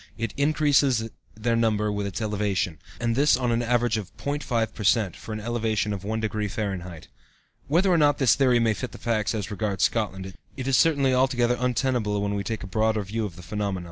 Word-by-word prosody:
It 115 -2 -3
increases 140 -5 +2 0.2
their 115 +2 0
number 105 -2 +1
with 100 -1 -2
its 100 +3 -4
elevation, 100 -6 -1 0.2
and 115 -1 0
this 140 0 +4
on 125 -2 0
an 115 +1 +1
average 120 -1 +1
of 100 -3 -8
0.5 125 -6 -2
per 105 - -7
cent, 105 -3 +2
for - - -9
an 110 - -3
elevation 110 -2 -1
of 100 - -5
1° 105 -1 -2
F." 85 -3 -10 0.6
Whether 175 +7 +3
or 170 - +4
not 145 -1 +4
this 135 -5 +4
theory 130 -3 +3
may 115 -2 +2
fit 125 +4 -6
the - - -8
facts 110 -2 -1
as 105 -1 -4
regards 105 -2 -1
Scotland, 95 -4 -1 0.2
it 130 -1 -4
is 135 - +3
certainly 140 -3 +3
altogether 125 -2 +2
untenable 125 -4 0
when 100 0 -1
we 100 0 -2
take 110 +2 -4
a - - -5
broader 110 +2 0
view 110 +3 -3
of 95 -5 -7
the 90 - -11
phenomena. 100 -1 -3
110 Hz, 205 wpm, -25 LUFS, 105-125 Hz, 0.6 s, this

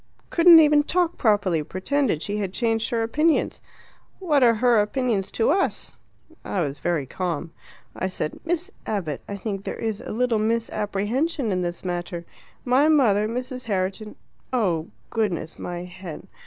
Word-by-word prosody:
Couldn't 335 -1 +8
even 300 -1 +6
talk 345 +3 +1
properly; 205 -7 +2
pretended 185 - -1
she 205 +1 -2
had 195 -3 -3
changed 225 -2 +1
her 230 -1 0
opinions. 305 +8 +1 0.6
What 310 -7 +2
are 235 -2 +5
her 235 0 +4
opinions 210 -2 -1
to 225 - +2
us? 380 +4 0 0.5
I 190 - -2
was 145 -3 -3
very 170 -5 -1
calm. 170 +2 -3 0.4
I 185 - -1
said: 185 -4 -4
'Miss 350 +3 -2 0.2
Abbott, 170 -10 -2
I 200 - -3
think 200 -1 -4
there - - -4
is 225 -1 -3
a - - -7
little 235 0 +1
misapprehension 225 +4 -1
in 185 -1 0
this 175 +1 -4
matter. 175 -1 -4 0.4
My 260 +4 +4
mother, 225 -9 +4
Mrs. 250 +2 -5
Herriton 195 +1 -2 0.2
' - - -38
Oh, 180 -10 0 0.2
goodness, 185 -8 -2
my 175 0 -5
head! 180 -2 -9
215 Hz, 155 wpm, -24 LUFS, 185-255 Hz, 0.6 s, Couldn't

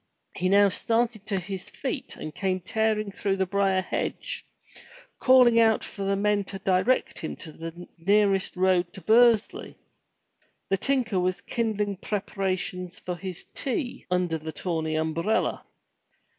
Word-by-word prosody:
He 185 +1 0
now 200 +1 +6
started 225 +1 0
to 200 - 0
his 190 +1 -7
feet 265 0 -5
and 155 - -7
came 185 0 -1
tearing 215 +2 0
through 195 0 -1
the 190 - +1
briar 195 0 +1
hedge, - - -3 0.8
calling 250 -3 +6
out 225 -1 +4
for 200 - -7
the 195 0 +1
men 205 0 +1
to 195 - -7
direct 190 +6 +1
him 160 - -4
the 165 +2 -9
nearest 195 +1 +2
road 180 -1 +2
to 190 - -10
Bursley. 230 0 +3 0.9
The 195 - +2
tinker 240 -4 +1
was 180 0 0
kindling 210 -4 -1
preparations 185 -3 -3
for 180 - -5
his 185 -1 -7
tea 260 -1 -3
under 180 -3 0
the 160 +1 -6
tawny 160 -1 -2
umbrella. 160 +7 0
195 Hz, 140 wpm, -26 LUFS, 180-215 Hz, 0.9 s, now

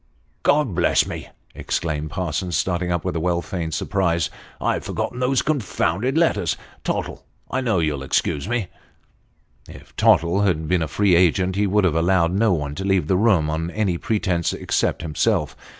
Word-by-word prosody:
" - - -41
God 145 -7 +1
bless 85 0 +3
me! - - -7
" - - -34
exclaimed 80 -2 -3
Parsons, 90 +2 -2
starting 90 -1 -1
up 85 -3 -1
with - - -2
well 85 +1 0
feigned 85 -4 -4
surprise, 85 -5 0 0.3
"I've - - -1
forgotten 125 - -3
those 130 0 +1
confounded 125 - 0
letters. 170 0 +1 0.3
Tottle, - - -3 0.3
I 130 - 0
know 115 -6 +1
you'll 75 -4 0
excuse 70 +5 -1
me." 120 -6 -1 1.0
If - - -14
Tottle 85 +4 +3
had 85 -6 +1
been 90 +1 +1
a 80 - -1
free 100 +5 +2
agent, 90 +2 +3
he 100 +1 +1
would 105 +1 +2
have 90 -4 +3
allowed 85 +1 +2
no 105 +2 +3
one 75 -5 -1
to 95 - -3
leave 95 -4 +2
the 90 - +1
room 95 -6 +3
on 80 +2 -2
any 95 -3 -1
pretence, 95 -6 0
except - - -1
himself. 75 -1 0
90 Hz, 175 wpm, -22 LUFS, 80-105 Hz, 1.0 s, bless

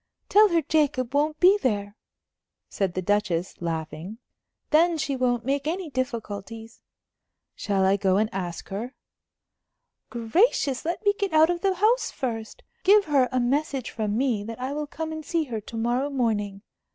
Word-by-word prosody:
"Tell 425 +2 +7
her 335 -2 +2
Jacob 285 -5 +1
won't 300 +2 +1
be 385 +3 +6
there," 205 -4 -1 0.7
said 190 -3 -2
the 185 - -2
Duchess, 185 -4 -1
laughing. 165 +4 -4 0.5
"Then 330 +2 +4
she 280 -2 -1
won't 245 -2 0
make 280 +2 -1
any 340 -1 -3
difficulties." 225 -3 -5 0.7
"Shall 195 -2 0
I 195 +1 +3
go 190 -1 +2
and 215 +1 +2
ask 175 -3 -5
her?" 220 +7 -5 1.1
"Gracious! 265 - +1
let 345 +6 -3
me 405 - +5
get 400 -5 -1
out 315 +2 +5
of 345 -1 -3
the 390 -1 +1
house 440 +7 +2
first. 225 -4 -5 0.2
Give 405 +2 +6
her 275 -5 +2
a 255 - +1
message 270 +1 -1
from 215 -2 -2
me 240 -5 0
that 225 +2 -7
I 260 +2 -3
will 300 0 -3
come 320 +2 -5
and 315 0 -6
see 330 +1 0
her 230 -7 -5
to 225 +2 -8
morrow 240 +5 0
morning. 210 -7 -1
255 Hz, 165 wpm, -25 LUFS, 210-310 Hz, 1.1 s, Tell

